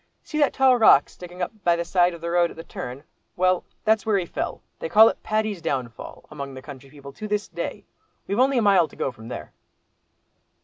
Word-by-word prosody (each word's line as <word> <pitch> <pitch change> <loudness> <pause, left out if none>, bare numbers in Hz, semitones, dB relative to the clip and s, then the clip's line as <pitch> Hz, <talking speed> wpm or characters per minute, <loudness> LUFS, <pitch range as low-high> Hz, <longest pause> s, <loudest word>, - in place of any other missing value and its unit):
See 305 - -4
that 290 - +3
tall 260 -2 +4
rock 215 -11 +6
sticking 180 0 -8
up - - -3
by 175 -1 +3
the 170 0 -3
side 175 0 +2
of 165 - -13
the 170 0 -3
road 175 0 +3
at - - -13
the 165 - -7
turn? 130 -3 -8 0.3
Well, 185 0 +2 0.2
that's 220 -1 +3
where 215 -2 +1
he 185 - -1
fell; - - -5 0.2
they 165 - -4
call 220 +4 +7
it - - -7
'Paddy's 215 -4 -1
Downfall,' 130 -7 -5
among 140 -2 -7
the 130 - -8
country 140 -2 -11
people 140 -1 -12
to 215 - -7
this 210 0 -1
day. - - -6 0.4
We've 200 +4 -2
only 265 +1 +3
a 235 - +2
mile 195 -5 +4
to - - -17
go 135 - -2
from 110 -2 -13
there." 75 -10 -8
175 Hz, 225 wpm, -24 LUFS, 145-215 Hz, 0.4 s, call